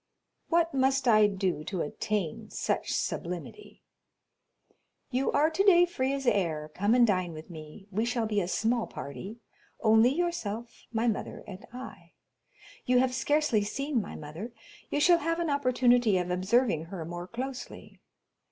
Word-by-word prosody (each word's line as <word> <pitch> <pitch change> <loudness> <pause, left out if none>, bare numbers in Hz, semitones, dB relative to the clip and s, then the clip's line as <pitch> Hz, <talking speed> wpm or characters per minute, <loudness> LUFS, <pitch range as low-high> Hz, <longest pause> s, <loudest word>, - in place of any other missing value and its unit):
"What 335 -1 +2
must 270 0 +2
I 215 -2 +6
do 190 -5 -2
to 185 -4 -3
attain 190 +2 -3
such - - -2
sublimity?" 180 - -4 1.3
"You 260 +2 +1
are 305 +3 +3
today 355 0 +5
free 270 -7 -1
as 275 -1 -3
air—come 180 0 +1
and 245 -1 +6
dine 185 -5 0
with 155 +3 -10
me; 155 +4 -11
we 210 +4 0
shall 235 -1 0
be 210 -2 0
a 175 - -2
small 225 +5 0
party—only 220 - -1
yourself, 255 -8 -3
my 230 +1 0
mother, 220 - -3
and 190 -1 -10
I. 255 +2 -10 0.7
You 250 0 +4
have 250 0 +3
scarcely 290 -5 +2
seen 275 +4 -1
my - - -8
mother; 160 +11 -8 0.4
you 290 - 0
shall 340 +3 +5
have 330 +2 -1
an 335 -3 0
opportunity 245 -6 +3
of 180 0 -2
observing 185 -2 +1
her 170 -1 -6
more 175 +1 -6
closely. 255 +3 -7
230 Hz, 145 wpm, -29 LUFS, 185-265 Hz, 1.3 s, I